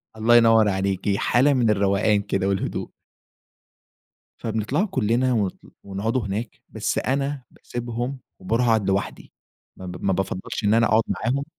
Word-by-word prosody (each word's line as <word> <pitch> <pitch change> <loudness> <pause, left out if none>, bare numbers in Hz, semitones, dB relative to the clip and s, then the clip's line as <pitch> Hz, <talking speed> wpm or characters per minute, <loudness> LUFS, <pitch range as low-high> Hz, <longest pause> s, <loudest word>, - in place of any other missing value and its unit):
الله 115 +2 +3
ينور 115 -2 +6
عليكِ، 95 +1 0
حالة 135 +7 +3
من 120 -4 +2
الروقان 100 0 +2
كده 95 -1 -1
والهدوء. 100 -1 -2 1.5
فبنطلع 115 - -1
كلنا 130 - +1
و 105 -5 +1 0.3
ونقعد 100 +5 -2
هناك 110 0 -4
بس - - -2
أنا 140 0 -1
باسيبهم 120 +2 -5 0.2
وباروح 120 +2 0
اقعد 110 -4 +2
لوحدي، 95 +1 -3 0.4
ما 95 - -9
ب 90 -1 -7
ما 95 - +2
بافضلش 95 +2 -3
إن 105 +1 +3
أنا 115 +1 +4
أقعد 110 0 +3
معاهم 135 +4 -1
110 Hz, 140 wpm, -23 LUFS, 100-120 Hz, 1.5 s, ينور